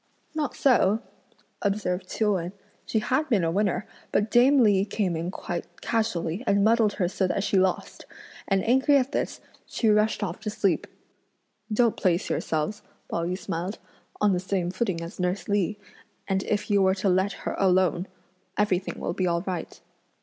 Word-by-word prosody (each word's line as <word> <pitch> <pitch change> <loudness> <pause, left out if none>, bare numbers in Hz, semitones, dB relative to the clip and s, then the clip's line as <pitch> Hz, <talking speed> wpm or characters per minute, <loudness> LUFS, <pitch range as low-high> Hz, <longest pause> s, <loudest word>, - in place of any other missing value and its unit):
"Not 310 -2 -2
so!" 230 -5 +3 0.6
observed 190 -3 -1
Chiu 210 -2 +1
Wen; 180 0 -3 0.3
"she - - 0
had 260 +8 0
been 210 -8 +3
a 165 - +1
winner, 200 +1 0 0.3
but 210 +1 +1
dame 255 +2 +6
Li 200 -3 +4
came 200 -3 -1
in 165 +2 -3
quite 175 -2 -5
casually 215 -4 -1
and 200 0 +3
muddled 220 -1 +4
her 180 - 0
so 190 +1 0
that 195 - -1
she 205 - 0
lost; 185 -1 -1 0.4
and 195 -2 +2
angry 265 +4 +5
at 265 0 0
this - - -2 0.3
she 225 - 0
rushed 210 0 +2
off 180 -4 -3
to - - -4
sleep." 195 -5 0 0.8
"Don't 230 +1 +3
place 175 -2 +1
yourselves," 160 +7 -1 0.3
Pao 170 - -1
yü 180 +1 -2
smiled, 190 +1 -4 0.4
"on 205 -2 +3
the 180 - +1
same 185 -1 -1
footing 190 -3 -1
as 170 - -9
nurse 180 +2 -1
Li, 205 0 0 0.5
and 190 -1 +1
if 210 0 -1
you 200 -1 +4
were 190 0 +4
to 195 +1 -1
let 190 +2 +2
her - - -1
alone, 185 -1 +2 0.5
everything 195 -2 0
will - - -2
be 185 - 0
all 170 0 0
right." 185 -3 -5
195 Hz, 175 wpm, -26 LUFS, 180-215 Hz, 0.8 s, dame